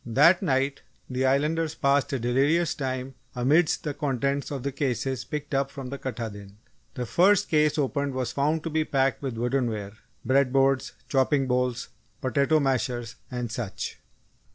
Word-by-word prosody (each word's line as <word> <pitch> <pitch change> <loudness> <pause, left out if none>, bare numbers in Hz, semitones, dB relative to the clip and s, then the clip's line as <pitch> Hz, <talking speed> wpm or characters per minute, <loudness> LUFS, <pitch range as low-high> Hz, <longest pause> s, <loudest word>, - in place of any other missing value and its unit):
That 150 +10 +5
night, 135 -4 0 0.3
the 130 +1 +1
Islanders 150 +4 +1
passed 140 +1 +2
a 135 - 0
delirious 140 +8 +2
time 130 -1 -4 0.2
amidst 150 +7 +2
the 150 - -2
contents 140 -1 -1
of 140 -4 -4
the 140 - -1
cases 130 -2 -2
picked 150 -1 -5
up 135 0 +1
from 135 -2 -7
the 140 +1 -6
Katahdin. 105 -6 -6 0.4
The 125 - -3
first 195 - +3
case 155 -1 +3
opened 140 -1 -1
was 130 -2 -1
found 150 +4 0
to 165 - -4
be 155 0 +1
packed 135 -2 +1
with 135 -4 -3
woodenware 115 -5 -1 0.3
bread 135 -1 +3
boards, 135 0 +2
chopping 135 -1 +2
bowls, 125 -1 -1 0.3
potato 140 +4 +2
mashers, 125 -4 -1
and 125 -2 -4
such. 110 -4 -5
135 Hz, 155 wpm, -26 LUFS, 125-145 Hz, 0.4 s, That